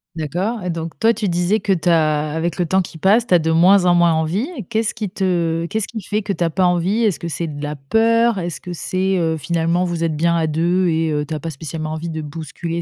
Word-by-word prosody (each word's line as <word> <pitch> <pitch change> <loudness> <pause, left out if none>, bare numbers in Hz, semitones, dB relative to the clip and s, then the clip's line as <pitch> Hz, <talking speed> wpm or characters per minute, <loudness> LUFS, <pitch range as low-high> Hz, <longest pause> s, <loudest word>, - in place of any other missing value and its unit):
D'accord 180 - -2
et 180 - -4
donc 165 -1 -5
toi, 225 +1 +4
tu 210 -3 -2
disais 180 +5 +1
que 200 - -1
tu 175 -2 0
as 155 -2 +2
avec 165 +2 -2
le 175 - +1
temps 190 +3 +2
qui 165 - -8
passe, 205 +8 +3
tu - - +1
as 175 - +6
de 160 +1 -1
moins 180 +4 +5
en 175 -1 +4
moins 170 -1 +4
envie 160 - 0
et 235 - -5
qu'est-ce 220 +3 -1
qui 215 -4 -4
te 170 -4 0
qu'est-ce 220 +1 -2
qui 220 -3 -6
fait 210 +2 -1
que 200 -1 -2
tu 175 - -2
as 165 - +1
pas 185 +2 +1
envie? 180 +6 +1
Est-ce 205 -6 +2
c'est 170 +1 -3
de 145 -1 -7
la 150 0 -4
peur? 225 - +2
Est-ce 175 -2 -4
que 180 -1 -7
c'est, 185 +2 -1
heu, 160 -2 0
finalement 170 +3 0
vous 170 -2 -2
êtes 155 -2 -1
bien 170 +1 +2
à 165 -1 +1
2 170 +4 +1
et 160 -1 0
heu, 150 0 -1
tu 155 - -6
as 155 - -3
pas 165 - -5
spécialement 155 +1 -5
envie 165 +2 -4
de 160 -1 -4
bousculer 165 +3 -5
170 Hz, 265 wpm, -19 LUFS, 160-190 Hz, -, as